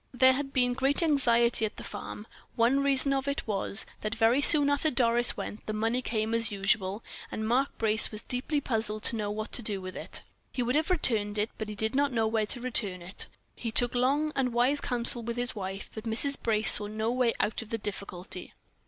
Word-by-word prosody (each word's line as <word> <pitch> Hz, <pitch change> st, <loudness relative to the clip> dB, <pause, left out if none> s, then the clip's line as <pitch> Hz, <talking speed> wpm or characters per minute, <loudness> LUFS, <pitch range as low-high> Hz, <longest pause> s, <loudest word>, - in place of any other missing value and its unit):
There 260 Hz, +1 st, +5 dB
had 275 Hz, +1 st, -4 dB
been 250 Hz, -2 st, +1 dB
great 270 Hz, +5 st, 0 dB
anxiety 240 Hz, -7 st, +2 dB
at 215 Hz, -, -3 dB
the -, -, -8 dB
farm; 210 Hz, -, -8 dB, 0.3 s
one 240 Hz, +4 st, +2 dB
reason 275 Hz, 0 st, +2 dB
of 270 Hz, 0 st, -2 dB
it 280 Hz, -, -2 dB
was, 200 Hz, 0 st, -1 dB, 0.2 s
that 215 Hz, +1 st, -3 dB
very 230 Hz, +4 st, +3 dB
soon 290 Hz, -1 st, +9 dB
after 285 Hz, +2 st, +1 dB
Doris 240 Hz, -2 st, +2 dB
went, 210 Hz, -, -7 dB
the 215 Hz, -, -3 dB
money 225 Hz, +4 st, -1 dB
came 220 Hz, -2 st, -2 dB
as 230 Hz, -1 st, +5 dB
usual, 195 Hz, +1 st, -1 dB, 0.3 s
and 220 Hz, 0 st, -4 dB
Mark 260 Hz, +4 st, 0 dB
Brace 215 Hz, -1 st, +3 dB
was 215 Hz, +1 st, -4 dB
deeply 260 Hz, +4 st, -3 dB
puzzled 220 Hz, -4 st, -2 dB
to -, -, +3 dB
know 210 Hz, -2 st, -3 dB
what 215 Hz, +1 st, -5 dB
to -, -, -2 dB
do 210 Hz, -3 st, -2 dB
with 185 Hz, 0 st, -8 dB
it. -, -, -3 dB, 0.3 s
He 250 Hz, -, -2 dB
would 245 Hz, +1 st, -1 dB
have 310 Hz, +4 st, 0 dB
returned 220 Hz, -, +1 dB
it, 210 Hz, +2 st, -1 dB
but 220 Hz, -1 st, -5 dB
he 210 Hz, -, -6 dB
did 220 Hz, +1 st, -1 dB
not 280 Hz, +1 st, +1 dB
know 225 Hz, -2 st, 0 dB
where 220 Hz, -1 st, -1 dB
to 245 Hz, -, -4 dB
return 210 Hz, -7 st, -1 dB
it 185 Hz, +3 st, -11 dB
to. -, -, +1 dB, 0.3 s
He 230 Hz, -, -5 dB
took 245 Hz, +1 st, +2 dB
long 275 Hz, +5 st, +1 dB
and 255 Hz, -3 st, -1 dB
wise 255 Hz, +4 st, +2 dB
counsel 240 Hz, -1 st, -2 dB
with 235 Hz, +1 st, -5 dB
his 245 Hz, +1 st, 0 dB
wife, 195 Hz, -1 st, -6 dB
but 220 Hz, +1 st, -8 dB
Mrs. 235 Hz, +5 st, +2 dB
Brace 215 Hz, -2 st, +3 dB
saw 205 Hz, -, +6 dB
no 220 Hz, +2 st, -2 dB
way 245 Hz, -2 st, +1 dB
out 210 Hz, -, -1 dB
of 225 Hz, -, -11 dB
the 230 Hz, -, -3 dB
difficulty. 190 Hz, -3 st, -6 dB
230 Hz, 225 wpm, -28 LUFS, 215-260 Hz, 0.3 s, soon